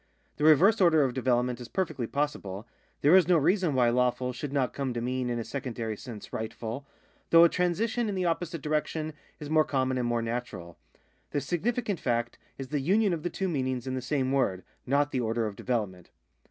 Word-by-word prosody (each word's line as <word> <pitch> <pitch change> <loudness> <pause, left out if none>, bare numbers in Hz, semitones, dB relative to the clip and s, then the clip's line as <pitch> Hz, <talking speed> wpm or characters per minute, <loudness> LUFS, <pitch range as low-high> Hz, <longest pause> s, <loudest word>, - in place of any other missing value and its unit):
The 150 - -3
reverse 170 +8 +6
order 160 -4 +5
of 130 -2 0
development 125 -1 0
is 120 - -7
perfectly 155 -11 -2
possible; 115 -8 -3 0.3
there 150 +6 +6
is 190 -2 +6
no 180 -2 +5
reason 175 0 +2
why 120 -2 +4
lawful 125 +1 +1
should 135 +3 -5
not 135 -3 0
come 135 -3 -3
to - - -1
mean 125 +1 -2
in 120 - -1
a 115 - -2
secondary 115 -3 -4
sense 110 -1 -10
rightful, 115 +4 -5 0.4
though 165 0 +8
a 170 - +7
transition 220 +7 0
in 200 - -2
the 185 -1 -1
opposite 165 -2 -2
direction 155 +1 -1 0.3
is 150 - -7
more 155 0 +5
common 130 -3 0
and 120 - 0
more 120 -1 0
natural. 115 -8 -5 0.5
The - - -1
significant 205 - -1
fact 120 -1 -1 0.2
is 135 -1 -7
the 150 0 -1
union 195 +7 +2
of 165 - -3
the 175 - -2
two 190 - -2
meanings 130 -6 -2
in 130 - -3
the 130 - -2
same 130 0 -1
word, 100 -9 +1 0.2
not 145 +2 +2
the 130 - -1
order 115 0 0
of 105 -2 -4
development. 100 -7 -3
135 Hz, 205 wpm, -28 LUFS, 120-160 Hz, 0.5 s, though